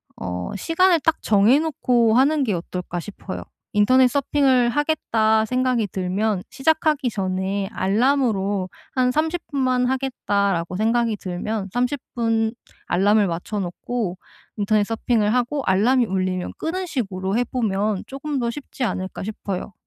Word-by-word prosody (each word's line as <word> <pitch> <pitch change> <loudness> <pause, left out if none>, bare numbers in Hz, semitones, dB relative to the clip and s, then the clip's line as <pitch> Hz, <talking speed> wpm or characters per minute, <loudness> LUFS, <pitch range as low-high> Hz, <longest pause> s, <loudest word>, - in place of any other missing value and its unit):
어 90 -1 -4
시간을 335 - +3
딱 325 +1 +2
정해 215 +7 +4
놓고 245 -7 +2
하는 280 +3 +4
게 220 -6 0
어떨까 175 0 -5
싶어요. 195 0 -7 0.3
'인터넷 255 +5 +5
서핑을 265 -2 +2
하겠다.' 225 -7 +1
생각이 250 -2 +1
들면 190 +2 -1
시작하기 300 -1 +1
전에 190 0 -2
알람으로 205 -4 +1 0.3
한 250 -1 +3
'30 320 +4 0
분만 255 -3 +1
하겠다.'라고 200 -9 -1
생각이 225 +2 +1
들면 195 +2 -4
30 250 +3 0 0.2
분 225 -1 +1 0.3
알람을 205 +3 +3
맞춰 175 +5 -3
놓고 190 +2 -3 0.4
인터넷 210 0 +2
서핑을 225 -1 0
하고 250 +3 0
알람이 235 +7 +3
울리면 185 -2 -2
끄는 365 +3 -3
식으로 195 - -2
해 245 - +3
보면 210 -4 -1
쪼금 275 +1 -4
더 235 -1 0
쉽지 265 0 -6
않을까 190 -4 -3
싶어요. 200 -2 -5
225 Hz, 290 characters per minute, -22 LUFS, 195-260 Hz, 0.4 s, 인터넷